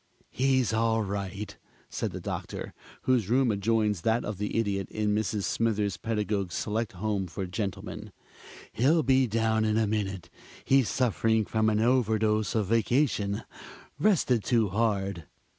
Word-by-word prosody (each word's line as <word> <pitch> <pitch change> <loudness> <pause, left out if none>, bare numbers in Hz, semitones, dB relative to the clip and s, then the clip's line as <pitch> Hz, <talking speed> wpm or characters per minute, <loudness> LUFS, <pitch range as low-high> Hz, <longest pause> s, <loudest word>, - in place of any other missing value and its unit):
"He's 130 -3 +2
all 115 0 +2
right," 100 +1 -4 0.3
said - - -3
the - - -6
Doctor, - - -5 0.3
whose 120 -6 +2
room 125 0 +3
adjoins 105 -1 +1
that 115 +5 +1
of 105 -2 -5
the 105 +2 -2
Idiot 100 -4 -1
in 105 -1 0
Mrs. 105 -1 -1
Smithers 105 -4 0
Pedagog's 105 -4 -2
Select 110 0 -2
Home 100 0 -2
for 95 +3 -5
Gentlemen. 95 +2 -5 0.6
"He'll 150 +8 +3
be 130 0 +3
down 110 0 +1
in 110 0 +1
a 110 - +3
minute. 95 -7 -3 0.3
He's 135 -3 +3
suffering 110 -3 +1
from 110 +1 +1
an 105 0 +1
overdose 110 -3 +2
of 110 -2 +2
vacation 115 -1 +1 0.6
rested 145 - +2
too 115 -4 +2
hard." 100 -5 -1
110 Hz, 140 wpm, -28 LUFS, 100-115 Hz, 0.6 s, room